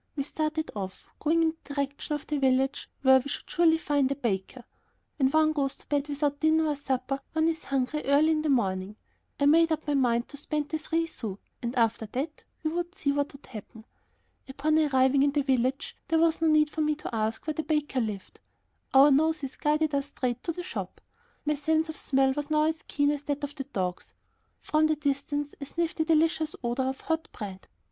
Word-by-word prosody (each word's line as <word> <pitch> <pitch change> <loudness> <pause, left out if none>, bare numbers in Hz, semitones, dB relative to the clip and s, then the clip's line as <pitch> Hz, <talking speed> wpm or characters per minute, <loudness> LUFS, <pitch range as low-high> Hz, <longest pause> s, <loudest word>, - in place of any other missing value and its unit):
We 280 - -1
started 310 +2 -2
off, 190 -2 -6
going 330 +2 +2
in 320 0 +1
the 285 - -8
direction 280 +2 -2
of 295 - -6
the 300 -1 -2
village 265 0 +1
where 265 0 +7
we 270 +2 -6
should - - -5
surely 330 -1 +4
find 285 -4 +1
a - - 0
baker: 235 -1 -3 0.5
when 265 -3 +3
one 310 +2 +3
goes 275 -3 -1
to - - -19
bed 290 -1 0
without 285 0 -1
dinner 315 0 +3
or 295 - 0
supper 275 -1 -2
one 320 0 +2
is 320 -1 -2
hungry 275 +2 -1
early 290 +3 +4
in 310 -1 +1
the 310 - -1
morning. 195 -6 0 0.4
I 285 - +3
made 330 +3 +5
up 315 -1 -1
my 295 - 0
mind 240 -3 +2
to 285 - -10
spend 295 0 -3
the 315 +1 -2
three 325 +2 0
sous, 215 -11 -6 0.2
and 240 +1 -3
after 225 -2 +1
that 295 +4 -3 0.2
we 310 - 0
would 350 +2 -3
see 290 -7 0
what 285 0 -1
would 275 - -14
happen. 220 0 -10 0.6
Upon 305 +4 +1
arriving 270 -2 +3
in 280 0 +3
the 290 -1 +1
village 260 0 0
there 325 - +2
was 325 0 +3
no 325 - +3
need 305 -1 +4
for 315 - -2
me 305 0 +2
to 290 - -6
ask 220 0 -1
where 310 - -1
the 315 - -2
baker 300 -4 0
lived; 210 -4 -5 0.6
our 280 +2 +8
noses 300 -1 +1
guided 300 0 +1
us 280 0 0
straight 250 -4 -3
to 335 - 0
the 355 +2 -6
shop. 370 - -6 0.5
My 300 - +2
sense 315 +2 +1
of 315 - -6
smell 270 -1 +2
was 290 +1 -4
now 305 0 +3
as 315 +1 0
keen 285 0 +2
as 295 -1 -3
that 290 0 -2
of 285 0 -3
my 270 - -3
dogs. 180 -4 -3 0.5
From 310 0 +2
the 310 - +2
distance 290 0 -2
I - - -3
sniffed 335 +3 -2
the 315 - +1
delicious 320 -1 +2
odor 250 +2 0
of 265 - -6
hot 320 0 -2
bread. 195 -4 -7
290 Hz, 215 wpm, -28 LUFS, 265-310 Hz, 0.6 s, our